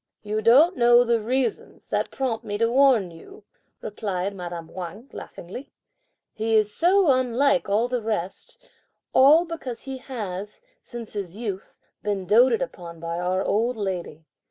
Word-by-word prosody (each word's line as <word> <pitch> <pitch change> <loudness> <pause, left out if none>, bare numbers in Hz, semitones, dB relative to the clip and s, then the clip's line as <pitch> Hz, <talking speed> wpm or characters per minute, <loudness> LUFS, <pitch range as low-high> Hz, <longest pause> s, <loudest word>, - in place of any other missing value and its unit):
"You 215 +1 -2
don't 290 +11 +5
know 240 0 +6
the 235 -2 +1
reasons 255 +4 -2
(that - - -1
prompt 245 -4 -3
me 205 -2 -4
to 230 +1 +1
warn 250 -8 +4
you)," 165 +5 -14 0.4
replied 200 -2 -3
madame 175 -3 -7
Wang 190 +8 -8
laughingly. 195 +11 -9 0.6
"He 220 0 0
is 210 -1 +2
so 360 -1 +4
unlike 260 0 +2
all 215 +4 +2
the 245 -1 -2
rest, 215 - -5 0.5
all 300 +6 +6
because 295 -8 -7
he 265 -1 -6
has, 210 -6 -6 0.2
since 235 -3 -9
his 195 -4 -5
youth 205 -5 -6
up, - - -42
been 200 -3 -2
doated 235 +5 +4
upon 175 -10 -9
by 170 +1 -4
our 185 +2 0
old 230 +3 0
lady! 180 -6 -4
225 Hz, 155 wpm, -24 LUFS, 190-255 Hz, 0.6 s, know